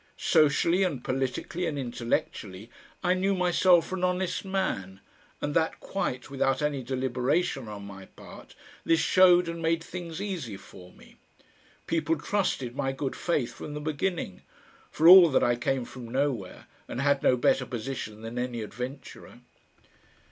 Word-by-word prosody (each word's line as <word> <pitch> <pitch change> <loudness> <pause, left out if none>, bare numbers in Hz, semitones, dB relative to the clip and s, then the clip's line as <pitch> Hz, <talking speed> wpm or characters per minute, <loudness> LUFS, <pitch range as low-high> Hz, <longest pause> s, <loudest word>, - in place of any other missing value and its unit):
Socially 160 +4 +3
and 150 -10 -1
politically 135 +7 -2
and 145 - -3
intellectually 115 -4 -3 0.3
I 180 - +3
knew 195 +2 +1
myself 180 -1 +4
for 190 - -4
an 180 - -5
honest 180 0 0
man, 185 - -3 0.4
and 145 - -3
that 160 +1 0
quite 125 -10 -3
without 135 -1 0
any 145 -2 -1
deliberation 130 +3 -1
on 105 -1 -8
my 95 -1 -10
part - - -14 0.3
this 165 0 +3
showed 180 -1 +5
and 170 0 -5
made 165 0 0
things 175 -2 -7
easy 175 - -4
for 90 -1 -14
me. - - -19 0.7
People 165 -1 0
trusted 145 -8 -1
my 135 -1 -1
good 135 0 -4
faith 150 -8 -1
from 150 - -8
the - - -4
beginning 155 - -3 0.5
for 160 - +2
all 180 -1 +10
that 135 - +2
I 120 - +3
came 125 +1 -1
from 120 -2 -10
nowhere 130 -7 -2 0.2
and 120 - -5
had 140 0 +2
no 125 - +3
better 125 +1 +2
position 115 -3 -6
than 115 +2 -5
any 120 -2 -3
adventurer. 125 +5 -8
140 Hz, 155 wpm, -27 LUFS, 120-175 Hz, 0.7 s, all